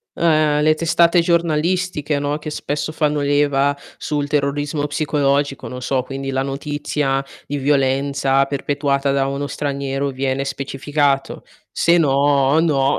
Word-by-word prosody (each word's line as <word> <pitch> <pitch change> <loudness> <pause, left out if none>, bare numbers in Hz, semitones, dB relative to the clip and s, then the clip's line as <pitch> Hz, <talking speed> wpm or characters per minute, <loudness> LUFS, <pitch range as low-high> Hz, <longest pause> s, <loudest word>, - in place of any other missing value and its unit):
eh, 155 -3 +2
le 155 +1 +5
testate 170 +2 +3
giornalistiche 170 -2 0
no, 145 +1 -2
che 155 - -6
spesso 150 0 -3
fanno 150 -1 0
leva 145 0 +2 0.2
sul 145 -1 -2
terrorismo 145 +1 -1
psicologico, 145 -2 0
non 125 0 -7
so 130 0 0
quindi 135 +1 -5
la 135 0 0
notizia 140 0 -2 0.2
di 145 - -3
violenza 135 0 +2
perpetuata 140 0 -1
da 135 0 +1
uno 140 +1 -3
straniero, 140 -1 -2
viene 135 0 -2
specificato. 140 +1 -1 0.3
Se 170 +1 +3
no, 140 -1 +3
no, 145 -4 +2
145 Hz, 130 wpm, -19 LUFS, 135-150 Hz, 0.3 s, le